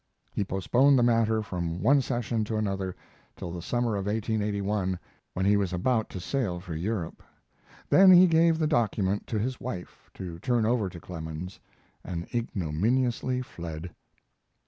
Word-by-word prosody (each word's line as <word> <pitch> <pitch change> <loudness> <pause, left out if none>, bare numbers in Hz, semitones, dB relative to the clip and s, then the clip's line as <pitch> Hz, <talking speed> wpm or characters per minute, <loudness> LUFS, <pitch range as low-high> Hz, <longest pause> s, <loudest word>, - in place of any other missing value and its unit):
He - - -1
postponed 120 +9 +3
the 120 - +4
matter 115 -2 +2
from 85 -4 -3
one 140 +4 +5
session 120 -3 -1
to 110 +1 -2
another 95 -3 -2 0.4
till 85 - -6
the 85 0 -6
summer 120 +3 0
of 100 0 -3
1881, 105 -3 -1 0.4
when 95 - 0
he 100 +1 +5
was 100 -3 0
about 110 +5 +1
to 95 - -6
sail 95 -3 -2
for 90 -2 -7
Europe. 90 0 -3 0.7
Then 190 0 +7
he 180 0 +9
gave 165 -1 +4
the 160 - +1
document 105 -9 0
to 110 - -2
his 125 +4 -2
wife, 100 -8 -7
to 85 -3 -7
turn 120 +2 +1
over 110 -4 +1
to 85 - -10
Clemens, 85 +1 -7 0.4
and 85 -2 -4
ignominiously 120 +5 0
fled. 85 -5 -7
105 Hz, 155 wpm, -28 LUFS, 90-120 Hz, 0.7 s, he